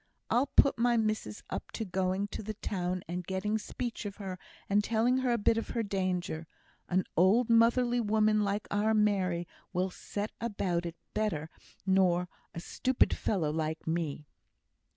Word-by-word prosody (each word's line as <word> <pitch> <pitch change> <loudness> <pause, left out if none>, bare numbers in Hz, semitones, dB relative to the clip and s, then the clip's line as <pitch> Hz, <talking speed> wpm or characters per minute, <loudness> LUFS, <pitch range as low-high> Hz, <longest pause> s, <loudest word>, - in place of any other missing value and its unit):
I'll 255 +4 +3
put 275 -2 +4
my 240 0 +3
missis 215 - -1
up - - -4
to 225 - -3
going 190 +1 0
to - - -5
the 215 0 -5
town 180 -3 -2
and 180 +2 -3
getting 200 +4 -1
speech 235 +2 -4
of 200 -1 -4
her, 190 -3 -6 0.3
and 205 +1 +3
telling 230 +4 +2
her 260 -1 +1
a 235 - +3
bit 225 +1 +3
of - - -6
her 230 - +2
danger. 185 -4 -2 0.4
An 185 +1 +2
old 215 +7 +4
motherly 240 +1 +4
woman 215 0 +3
like 200 +1 -1
our 215 +2 +2
Mary 185 -5 +2 0.3
will 185 +1 0
set 205 +3 -4
about 185 -6 -1
it 170 - -6 0.2
better 175 -8 -1 0.3
nor 180 -2 +3 0.3
a - - -3
stupid 255 +8 +1
fellow 165 -8 0
like 160 0 -2
me." 160 -3 -2
200 Hz, 165 wpm, -31 LUFS, 180-220 Hz, 0.4 s, put